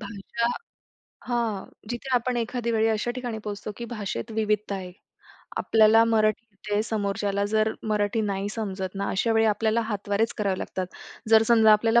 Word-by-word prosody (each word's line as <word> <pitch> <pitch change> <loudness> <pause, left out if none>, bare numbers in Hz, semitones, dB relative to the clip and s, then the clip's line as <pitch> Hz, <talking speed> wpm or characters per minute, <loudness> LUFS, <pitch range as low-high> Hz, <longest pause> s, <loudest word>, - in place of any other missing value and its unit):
भाषा 205 +2 -3 0.8
हां. 230 -5 -1 0.2
जिथे 240 +3 -5
आपण 245 0 0
एखाद्या 235 0 -2
वेळी 220 0 +3
अशा 220 +2 0
ठिकाणी 245 -3 -4
पोहोचतो 210 0 -5
की 235 - -5
भाषेत 215 0 -5
विविधता 210 -2 0
आहे. 185 -2 -6 0.7
आपल्याला 225 +1 +5
मराठी 220 0 +2
येते 205 +1 -2
समोरच्याला 200 -2 -1
जर 215 +1 +2 0.2
मराठी 210 +1 +1
नाही 200 -1 -1
समजत 195 -4 -4
ना, 200 0 -2
अशा 225 +4 +1
वेळी 225 0 +3
आपल्याला 220 +2 +2
हातवारेच 205 +1 0
करावे 195 -3 0
लागतात. 185 -1 -4 0.4
जर 220 0 +7
समजा 220 -2 +7
आपल्याला 225 +2 +4
215 Hz, 155 wpm, -26 LUFS, 205-230 Hz, 0.8 s, जर